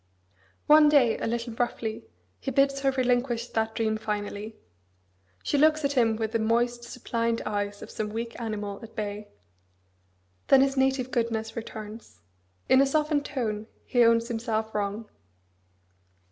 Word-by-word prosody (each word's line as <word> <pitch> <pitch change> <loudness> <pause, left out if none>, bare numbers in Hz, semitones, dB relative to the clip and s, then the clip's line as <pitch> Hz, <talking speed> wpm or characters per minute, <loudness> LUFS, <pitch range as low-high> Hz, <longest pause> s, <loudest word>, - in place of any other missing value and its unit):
One 300 0 +7
day, 265 -6 +4
a - - -2
little 235 0 -3
roughly, 225 -2 -3 0.3
he - - -4
bids 275 +1 +2
her 275 0 +2
relinquish 245 -2 0
that 220 0 -1
dream 220 -1 0
finally. 210 0 -4 0.9
She 290 - +1
looks 310 0 +4
at 280 - +1
him 235 -5 +2
with 220 -1 -2
the 230 - 0
moist, 240 +2 +1
suppliant 230 -1 -2
eyes 205 -1 -3
of - - -10
some 215 -1 -3
weak 230 +2 -5
animal 210 -3 -4
at 225 - -12
bay. 210 -1 -4 1.2
Then 270 -1 +7
his 275 0 +2
native 265 -1 +1
goodness 225 -2 -1
returns. 220 - -8 0.5
In 260 - +6
a - - +5
softened 300 0 +1
tone 220 -6 -3 0.2
he 245 -1 +3
owns 230 0 +4
himself 225 -2 -2
wrong. 210 +1 -3
230 Hz, 145 wpm, -27 LUFS, 220-260 Hz, 1.2 s, One